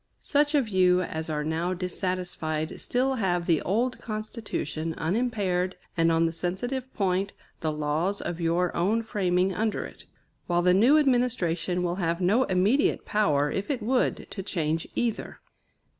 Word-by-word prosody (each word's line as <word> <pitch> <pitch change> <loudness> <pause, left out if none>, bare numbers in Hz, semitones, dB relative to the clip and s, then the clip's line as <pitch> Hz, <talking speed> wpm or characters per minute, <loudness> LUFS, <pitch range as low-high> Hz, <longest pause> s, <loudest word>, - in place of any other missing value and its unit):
Such 290 +1 +2
of 275 -5 +2
you 185 -2 +3
as 160 -1 -4
are 150 -1 -1
now 165 +4 -1
dissatisfied 180 -4 -3
still 260 +2 +1
have 175 -5 0
the 165 -4 +2
old 240 +7 0
Constitution 215 -8 -4
unimpaired, 185 -1 0 0.2
and 165 -1 +3
on 165 0 +3
the 165 - 0
sensitive 245 +10 -3
point, 195 0 0 0.3
the 155 - -1
laws 155 +6 -1
of 175 0 -4
your 170 +2 +1
own 210 +7 +1
framing 185 -3 +1
under 215 +2 -1
it; - - -12 0.4
while 175 0 +1
the 180 0 +5
new 240 +11 +6
administration 225 - +1
will 175 0 -1
have 170 -2 0
no 205 +8 +3
immediate 195 +10 +2
power, 150 -9 +2
if 195 - -3
it 260 -6 -1
would, 250 +3 +1
to 195 - -4
change 165 -4 -2
either. 235 -3 -2
185 Hz, 155 wpm, -27 LUFS, 170-220 Hz, 0.4 s, new